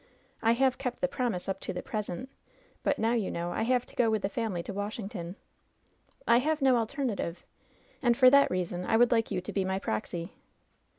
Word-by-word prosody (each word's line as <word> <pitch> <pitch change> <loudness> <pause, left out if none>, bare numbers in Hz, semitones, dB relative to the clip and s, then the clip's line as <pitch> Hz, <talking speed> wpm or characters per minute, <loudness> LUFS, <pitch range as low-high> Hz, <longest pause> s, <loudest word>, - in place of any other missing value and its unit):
I 225 +1 +4
have 260 +1 +2
kept 250 -3 -3
the 270 - +1
promise 235 -9 -2
up 195 0 -2
to - - -5
the 180 - -5
present; 215 +3 -4 0.5
but - - +1
now, 225 +2 +1
you 225 -5 0
know, 170 +1 -3
I - - -2
have 250 +2 +2
to - - -18
go 240 -2 +3
with 220 -2 0
the 195 - 0
family 200 -5 -2
to 200 - -6
Washington. 200 -3 -5 0.9
I 235 - +6
have 310 +4 0
no 265 -3 +4
alternative, 225 - -2 0.6
and 240 -3 +3
for 255 -2 +7
that 280 0 +6
reason 180 -1 -2
I 225 - +2
would 240 +1 +5
like 225 -2 +2
you 180 - -2
to 180 - -7
be 195 - +1
my 190 0 -1
proxy.'' 170 - -3
220 Hz, 210 wpm, -29 LUFS, 185-245 Hz, 0.9 s, for